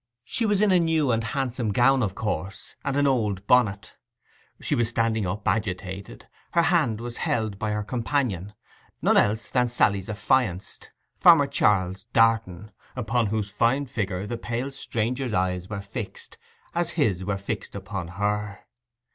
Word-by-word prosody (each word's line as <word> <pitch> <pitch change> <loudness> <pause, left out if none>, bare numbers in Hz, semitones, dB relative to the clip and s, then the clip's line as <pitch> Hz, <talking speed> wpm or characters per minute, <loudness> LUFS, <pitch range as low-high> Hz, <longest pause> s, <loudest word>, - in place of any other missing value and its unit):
She 225 - -1
was 205 -1 +2
in 210 -2 +4
a 185 - +5
new 160 -5 +2
and 115 0 +1
handsome 120 -1 -2
gown, 130 +5 +4
of 95 -5 -1
course, 100 -1 -4
and 140 0 -1
an 145 - +3
old 105 -8 0
bonnet. 110 -4 +2 0.6
She - - -1
was 120 -1 +2
standing 115 -3 0
up, 100 +3 -4
agitated; 95 - -3 0.3
her 170 - +4
hand 155 -11 +2
was 120 0 -5
held 110 -4 -1
by 110 - -1
her 105 0 -1
companion—none 115 - -2
else 110 +2 +2
than 125 -1 +1
Sally's 100 -5 +1
affianced, 105 -3 -1 0.3
Farmer 165 -5 +7
Charles 95 -8 +1
Darton, 110 -3 +2 0.2
upon 120 -1 0
whose 105 -1 -2
fine 120 +7 +2
figure 100 -6 -3
the 120 +2 -4
pale 120 +3 -3
stranger's 125 -1 -2
eyes 90 -1 -1
were 100 -2 -4
fixed, 100 +2 -7 0.3
as 170 -1 0
his 100 - +1
were 100 +1 -1
fixed 100 +1 -5
upon 95 -2 -5
her. 105 +2 -2
110 Hz, 155 wpm, -25 LUFS, 100-125 Hz, 0.6 s, Farmer